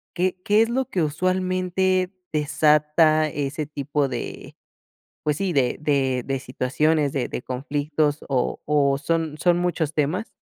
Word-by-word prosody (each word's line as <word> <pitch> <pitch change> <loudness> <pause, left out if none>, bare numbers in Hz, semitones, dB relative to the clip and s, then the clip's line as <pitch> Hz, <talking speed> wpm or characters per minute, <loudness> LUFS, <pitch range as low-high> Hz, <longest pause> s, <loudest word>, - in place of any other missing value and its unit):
¿qué 185 +1 -1
qué 210 +1 +4
es 225 - -2
lo 260 +2 0
que 180 -8 0
usualmente 185 +3 0 0.2
desata 150 +1 +3
ese 145 +1 -3
tipo 145 -1 -1
de, 125 -3 -6 0.7
pues 150 -1 0
sí, 190 -1 -1
de 130 -4 +1
de 135 -4 +1
de 135 -1 -2
situaciones, 140 +3 0
de 135 -3 -1
de - - -4
conflictos, 145 +3 -1
o 130 -3 0
o 140 -2 +2
son 160 +1 -1
son 175 -1 +3
muchos 170 -4 -1
temas? 160 +9 0
150 Hz, 145 wpm, -23 LUFS, 140-180 Hz, 0.7 s, qué